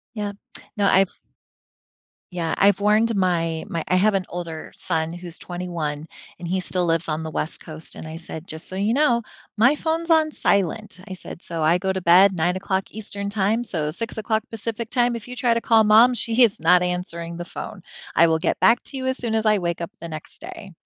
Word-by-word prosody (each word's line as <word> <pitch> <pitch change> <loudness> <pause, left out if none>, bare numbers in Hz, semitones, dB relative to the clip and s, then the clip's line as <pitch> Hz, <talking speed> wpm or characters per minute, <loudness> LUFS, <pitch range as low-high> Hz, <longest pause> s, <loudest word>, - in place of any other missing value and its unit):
Yep. 205 -2 -4 0.4
No, 205 -1 +2
I've 195 -1 +4 1.2
Yeah, 170 -3 -2
I've 200 -1 +4
warned 215 +3 +3
my 165 -4 0
my 170 -5 -2
I - - +2
have 210 +3 +3
an 190 -1 +1
older 170 -2 -6
son, 165 -2 -2
who's 175 -1 -7
21, 170 -4 -4 0.3
and 175 -1 -6
he 190 +1 0
still 180 0 -1
lives 165 0 +1
on 155 +1 -1
the 160 - -4
West 155 +1 -2
Coast, 155 0 -9
and - - -8
I 160 - -7
said, 165 0 -8
"Just 160 +1 -9
so 185 - -7
you 205 +3 +1
know, 245 -5 +3 0.3
my 245 +7 +5
phone's 330 +2 -2
on 315 -1 +4
silent," 200 - 0
I 190 - -5
said, 180 -1 -9
"so 165 -2 -4
I 165 +3 +4
go 190 +1 0
to 190 - -3
bed 185 +3 +6
09:00 185 +2 -1
Eastern 200 -2 -6
Time, 210 +3 +1
so 155 -9 -2
06:00 220 +2 -2
Pacific 225 0 -5
time 245 -1 +2
if 225 - -9
you 250 - -7
try 240 -2 +2
to 230 - 0
call 225 -2 +4
Mom, 225 +4 +7
she 230 +1 +2
is 230 -4 +4
not 180 +2 +5
answering 170 -2 -3
the 175 - -5
phone, 190 +2 -8 0.3
I 170 - +7
will 160 0 +2
get 165 - 0
back 235 +1 +5
to 275 - -7
you 260 - -3
as 260 0 0
soon 230 -2 -2
as 220 0 0
I 210 -1 +4
wake 170 -1 -2
up 170 - -4
the 170 - -6
next 155 - -8
day." 335 - -9
190 Hz, 215 wpm, -23 LUFS, 170-225 Hz, 1.2 s, Mom